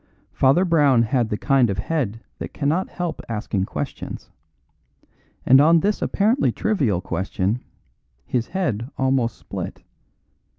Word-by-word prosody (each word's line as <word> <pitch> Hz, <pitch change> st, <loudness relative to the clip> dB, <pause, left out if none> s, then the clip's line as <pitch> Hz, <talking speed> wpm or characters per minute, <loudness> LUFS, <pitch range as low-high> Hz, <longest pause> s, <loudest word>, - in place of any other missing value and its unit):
Father 140 Hz, +8 st, +3 dB
Brown 145 Hz, -8 st, +4 dB
had 115 Hz, 0 st, 0 dB
the 105 Hz, -, -1 dB
kind 135 Hz, -2 st, +3 dB
of 100 Hz, -, -2 dB
head 115 Hz, -2 st, -2 dB, 0.2 s
that -, -, -7 dB
cannot 155 Hz, +6 st, 0 dB
help 175 Hz, -3 st, -4 dB
asking 105 Hz, -3 st, -2 dB
questions; -, -, -6 dB, 1.1 s
and 130 Hz, +2 st, +7 dB
on 165 Hz, +2 st, +5 dB
this 205 Hz, +4 st, 0 dB
apparently 225 Hz, +7 st, +2 dB
trivial 135 Hz, -, 0 dB
question 95 Hz, +5 st, -2 dB, 0.6 s
his 120 Hz, -2 st, -1 dB
head 125 Hz, -, -2 dB
almost 130 Hz, -4 st, +1 dB
split. -, -, -7 dB
130 Hz, 125 wpm, -22 LUFS, 115-165 Hz, 1.1 s, and